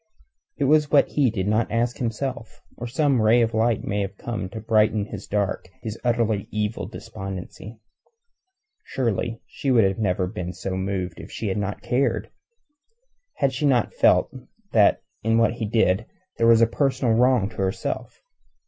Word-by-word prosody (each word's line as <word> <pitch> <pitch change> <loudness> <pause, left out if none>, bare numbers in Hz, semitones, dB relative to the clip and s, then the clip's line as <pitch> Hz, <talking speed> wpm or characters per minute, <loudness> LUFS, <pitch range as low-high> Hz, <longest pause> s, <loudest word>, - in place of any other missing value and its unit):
It - - -1
was 150 +1 +4
what 145 -2 +4
he 140 -4 +2
did 100 -3 -2
not 110 +2 +1
ask 120 +1 0
himself, 125 +1 -4 0.2
or 120 - -6
some 135 0 +2
ray 115 +2 +5
of 115 0 -1
light 110 0 +1
might 100 - -2
have 95 0 -5
come 110 -6 -4
to 110 - -7
brighten 110 -1 +2
his - - -8
dark, 100 -3 -2
his 110 -1 -4
utterly 115 -4 +1
evil 105 +1 -2
despondency. 105 0 -8 1.0
Surely 115 -2 -2
she 140 - -4
would 110 -6 +3
never 95 -3 +1
have 90 - -7
been 90 -2 -4
so 95 0 -4
moved 95 -2 -3
had - - -9
she 105 -4 -2
not 105 0 -3
cared 125 -3 0 1.0
had 135 -1 +1
she 145 +3 0
not 125 -5 +2
felt - - +3 0.4
that 105 -3 +4 0.2
in 115 +1 +2
what 115 -1 +3
he 115 -2 -4
did 110 -1 +2 0.3
there 115 - +4
was 115 0 +6
a - - +7
personal 130 0 +1
wrong 125 -3 +3
to 110 - -16
herself. 95 -1 -3
110 Hz, 165 wpm, -24 LUFS, 100-120 Hz, 1.0 s, a